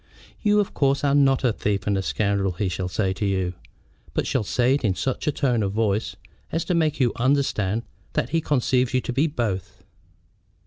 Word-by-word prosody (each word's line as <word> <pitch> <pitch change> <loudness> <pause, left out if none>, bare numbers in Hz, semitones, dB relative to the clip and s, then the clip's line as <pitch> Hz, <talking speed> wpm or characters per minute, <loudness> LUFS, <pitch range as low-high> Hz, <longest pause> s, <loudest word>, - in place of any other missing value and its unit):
"You, 210 -1 +3
of 205 - -1
course, 140 0 +1
are 140 -1 +3
not 135 -2 +4
a 120 -3 +3
thief 100 -1 -1
and 100 - +1
a 95 - 0
scoundrel," 100 -1 0
he 95 +2 -1
shall 90 0 -3
say 95 +1 0
to 95 - -5
you, 95 -3 0 0.6
but - - 0
shall - - 0
say 125 +5 +2
it 140 - 0
in 100 -4 +1
such 130 +7 -2
a - - +4
tone 125 -5 +1
of 100 -1 -1
voice 110 -1 0 0.4
as 165 0 -1
to 180 - 0
make 155 -4 +1
you 125 -3 +3
understand 115 -5 +1 0.3
that - - 0
he 165 +1 +1
conceives 130 -3 +1
you 130 - +3
to 125 - -4
be 140 +6 +2
both. 115 - -3
120 Hz, 210 wpm, -24 LUFS, 100-140 Hz, 0.6 s, not